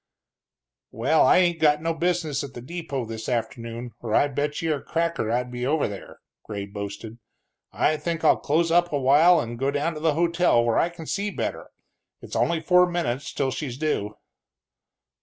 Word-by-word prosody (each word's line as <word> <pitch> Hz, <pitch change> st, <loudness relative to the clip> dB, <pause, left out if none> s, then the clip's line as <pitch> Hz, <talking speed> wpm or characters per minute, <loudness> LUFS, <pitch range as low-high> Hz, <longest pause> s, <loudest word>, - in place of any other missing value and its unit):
"Well, 135 Hz, +8 st, +2 dB
I -, -, +6 dB
ain't 175 Hz, -2 st, +2 dB
got 150 Hz, -1 st, +4 dB
no 165 Hz, 0 st, 0 dB
business 165 Hz, -3 st, -1 dB
at 140 Hz, -, -9 dB
the 120 Hz, -, -7 dB
depot 140 Hz, -4 st, -4 dB
this 110 Hz, 0 st, -6 dB
afternoon, 115 Hz, 0 st, -4 dB
or 110 Hz, -2 st, -2 dB
I 145 Hz, -, +4 dB
bet 145 Hz, +2 st, -2 dB
you 160 Hz, -1 st, +1 dB
a 145 Hz, -, -4 dB
cracker 165 Hz, -8 st, -1 dB
I'd 125 Hz, +1 st, -1 dB
be 125 Hz, 0 st, -5 dB
over 145 Hz, +4 st, +1 dB
there," 100 Hz, -2 st, -10 dB, 0.2 s
Gray 100 Hz, -2 st, -5 dB
boasted. 100 Hz, +3 st, -7 dB, 0.5 s
"I 155 Hz, -, +1 dB
think 165 Hz, +1 st, -3 dB
I'll -, -, +5 dB
close 165 Hz, +3 st, +1 dB
up 175 Hz, +1 st, +3 dB
a 145 Hz, -, 0 dB
while 150 Hz, +7 st, +5 dB
and 120 Hz, 0 st, -5 dB
go 135 Hz, +1 st, +1 dB
down 145 Hz, +4 st, -1 dB
to 155 Hz, -, -7 dB
the 155 Hz, -1 st, +1 dB
hotel 170 Hz, -7 st, +2 dB
where 115 Hz, -, +2 dB
I 170 Hz, -, +2 dB
can 170 Hz, -1 st, -10 dB
see 200 Hz, +5 st, -2 dB
better -, -, -4 dB, 0.5 s
it's -, -, -9 dB
only 170 Hz, -1 st, +1 dB
forty 180 Hz, +1 st, +4 dB
minutes 150 Hz, -7 st, -2 dB
till 135 Hz, -2 st, -1 dB
she's 130 Hz, -2 st, -5 dB
due." 120 Hz, -9 st, -2 dB
145 Hz, 190 wpm, -24 LUFS, 120-165 Hz, 0.5 s, I